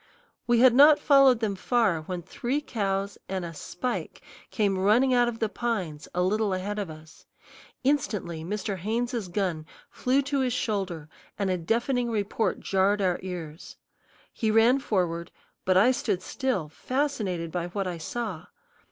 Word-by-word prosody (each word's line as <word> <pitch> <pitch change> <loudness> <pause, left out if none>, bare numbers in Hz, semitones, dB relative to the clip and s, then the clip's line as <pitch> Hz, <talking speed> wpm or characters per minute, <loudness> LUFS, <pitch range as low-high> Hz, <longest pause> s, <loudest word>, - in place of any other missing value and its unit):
We 240 -1 +4
had 255 -2 +7
not 290 +3 +8
followed 275 -4 +5
them 210 -3 0
far 205 -5 +1
when 175 +2 -5
three 250 - -2
cows 200 -7 -2
and 190 -2 -2
a 165 - -7
"spike" 240 +9 -5 0.3
came 200 -4 0
running 235 +7 +4
out 245 -1 +4
of 235 -1 -3
the 225 - 0
pines 190 -10 -3
a 180 - +2
little 205 +1 +1
ahead 205 +3 -3
of 200 -4 -3
us. 155 0 -13 0.6
Instantly 210 - -1
Mr. 200 +2 -3
Haynes's 230 +2 -2
gun 175 -4 -2 0.3
flew 265 +3 +1
to 280 0 -1
his 255 -2 +1
shoulder 190 -10 -2 0.3
and 195 -2 0
a 185 - +1
deafening 240 +7 0
report 210 -2 -1
jarred 195 +2 +2
our 185 -3 +1
ears. 170 -4 -7 0.6
He 220 - -1
ran 225 +5 +5
forward, 175 -9 -1 0.4
but 185 0 +3
I 210 +7 +6
stood 210 -8 -1
still, 255 - -2
fascinated 200 - -2
by 175 0 -2
what 195 +2 -3
I 175 -2 -4
saw. 190 -2 -5
205 Hz, 160 wpm, -27 LUFS, 180-240 Hz, 0.6 s, not